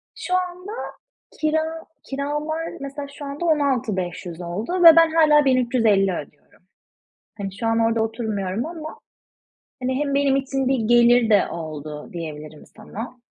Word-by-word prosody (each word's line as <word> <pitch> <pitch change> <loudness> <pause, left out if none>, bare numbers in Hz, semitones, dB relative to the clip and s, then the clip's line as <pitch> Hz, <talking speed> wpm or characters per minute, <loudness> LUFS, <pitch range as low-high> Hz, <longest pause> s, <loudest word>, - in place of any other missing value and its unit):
Şu 365 - -5
anda 365 +2 -5 0.7
kira, 315 +1 -1 0.2
kiralar 295 +4 -3
mesela 280 +1 -6
şu 285 - -8
anda 280 +5 -5
16.500 210 - -1
oldu 215 - -2
ve 330 -1 +11
ben 330 -1 +6
hâlâ 300 -3 +5
1.350 235 -7 +3
ödüyorum. 150 +2 -11 0.8
Hani, 195 -1 -4
şu 230 - -2
an 225 0 +2
orada 225 0 +2
oturmuyorum 220 -1 -3
ama, 315 -2 -8 0.8
hani, 260 +1 0
hem 285 -1 -1
benim 280 -1 +3
için 270 -1 -1
bir 265 -1 +2
gelir 240 -1 +5
de 205 -2 +4
oldu 155 -2 -7
diyebilirim 155 -2 -8
sana. 225 +3 -9
255 Hz, 135 wpm, -22 LUFS, 200-300 Hz, 0.8 s, ve